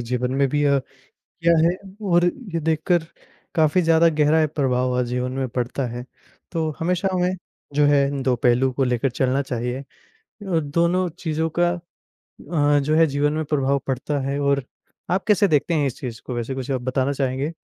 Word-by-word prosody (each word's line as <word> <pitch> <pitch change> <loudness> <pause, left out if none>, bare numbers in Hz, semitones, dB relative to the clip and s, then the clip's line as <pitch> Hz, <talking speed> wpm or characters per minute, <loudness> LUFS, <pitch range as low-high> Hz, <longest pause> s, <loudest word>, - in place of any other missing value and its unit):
जीवन 125 +1 -2
में 135 - +4
भी 145 +2 0
अ, 140 -1 +4 0.4
किया 170 0 0
है 175 +2 +1 0.4
और 175 0 +5 0.3
ये 165 - 0
देखकर 160 +2 +1 0.5
काफ़ी 160 +3 +3
ज़्यादा 165 0 +5
गहरा 155 0 +3
अ, - - +3
प्रभाव 130 -3 +1
अ, - - +2
जीवन 125 +1 -2
में 130 -1 -2
पड़ता 125 +2 -2
है। 120 +1 -6 0.5
तो 160 -2 -1
हमेशा 180 +3 0
हमें 180 0 +1 0.4
जो 145 0 +4
है 140 -1 +2
दो 130 -1 +2
पहलू 125 +2 +2
को 135 +1 0
लेकर 125 +1 0
चलना 130 +2 0
चाहिए। 125 0 -3
अ, - - -8 0.6
दोनों 170 +1 +1
चीज़ों 160 -1 -2
का 175 - +4 0.6
अ, 145 -2 0
जो 150 +3 0
है 165 0 +6
जीवन 145 +1 0
में 155 0 -2
प्रभाव 140 -1 +1
पड़ता 135 +3 -1
है 140 +1 -1
और 140 -1 +1 0.5
आप 190 +1 +1
कैसे 205 -1 +4
देखते 155 +1 +1
हैं 145 -3 +2
इस 125 - -6
चीज़ 120 -4 -6
को, 125 - -6
वैसे 120 +3 -3
कुछ 135 +1 -4
आप 130 -2 -1
बताना 130 +2 0
चाहेंगे? 135 +3 -2
140 Hz, 185 wpm, -22 LUFS, 130-160 Hz, 0.6 s, है